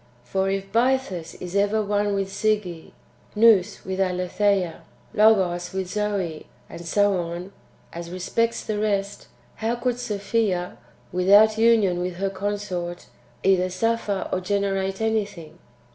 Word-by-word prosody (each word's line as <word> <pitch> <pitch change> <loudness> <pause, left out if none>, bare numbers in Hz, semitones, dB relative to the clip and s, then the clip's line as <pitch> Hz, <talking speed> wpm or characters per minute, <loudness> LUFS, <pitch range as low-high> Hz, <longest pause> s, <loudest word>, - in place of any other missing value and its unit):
For 190 +9 -1
if 195 0 -3
Bythus 235 -8 0
is 180 +1 -7
ever 205 +2 +2
one 205 0 0
with 195 -1 -1
Sige, 200 -5 -1 0.4
Nous 210 -4 +4
with 190 0 -3
Aletheia, 185 0 0 0.3
Logos 190 -5 +3
with 190 -1 -3
Zoe, 200 -7 -2 0.2
and 170 - -9
so 205 +4 +2
on, 175 +2 -5 0.4
as 170 0 -7
respects 230 +6 -1
the 210 -1 -2
rest, 205 -1 -1 0.3
how 225 +2 -1
could 245 0 -2
Sophia, 200 -4 -1 0.3
without 205 +4 +5
union 220 -6 +4
with 180 0 -3
her 195 +2 -2
consort, 190 -3 -4 0.4
either 185 -1 +3
suffer 210 +1 -1
or 185 - 0
generate 195 0 -1
anything 205 -8 -2
195 Hz, 130 wpm, -24 LUFS, 180-210 Hz, 0.4 s, without